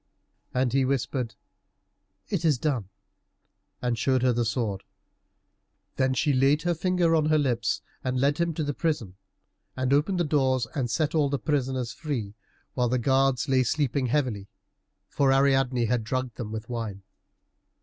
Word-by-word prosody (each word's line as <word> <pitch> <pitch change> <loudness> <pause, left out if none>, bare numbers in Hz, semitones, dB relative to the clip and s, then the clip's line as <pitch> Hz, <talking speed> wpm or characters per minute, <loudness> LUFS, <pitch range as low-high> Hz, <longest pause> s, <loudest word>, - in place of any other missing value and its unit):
And 125 -1 0
he 135 0 +3
whispered, 130 -3 -1 0.9
"It 185 -4 -2
is 155 -5 +3
done," 120 -8 -1 0.9
and 120 -2 0
showed 130 +2 +2
her 125 -1 +4
the 120 0 +1
sword. 105 -3 -2 1.1
Then 130 0 +2
she 145 +2 +2
laid 135 +3 +3
her 175 0 +1
finger 175 0 +1
on 155 -1 +2
her 155 0 +4
lips, 125 -5 0 0.2
and 130 0 -1
led 140 +3 +2
him 170 0 +1
to 155 - -1
the 145 0 -2
prison 135 - -2 0.6
and 130 +1 +1
opened 165 +6 +2
the - - +3
doors, 130 -5 +1
and 130 -5 -1
set 145 +7 0
all 150 -3 +2
the 140 - 0
prisoners 130 -3 -1
free, 125 -11 -4 0.4
while 125 -2 +1
the 125 - +1
guards 135 +2 +2
lay 130 -1 +3
sleeping 135 0 0
heavily, 120 -7 -1 0.6
for 140 -2 +2
Ariadne 135 -3 +3
had 115 0 0
drugged 130 +2 -2
them 110 -3 -6
with 110 +1 -5
wine. 110 -5 -5
130 Hz, 160 wpm, -26 LUFS, 120-145 Hz, 1.1 s, her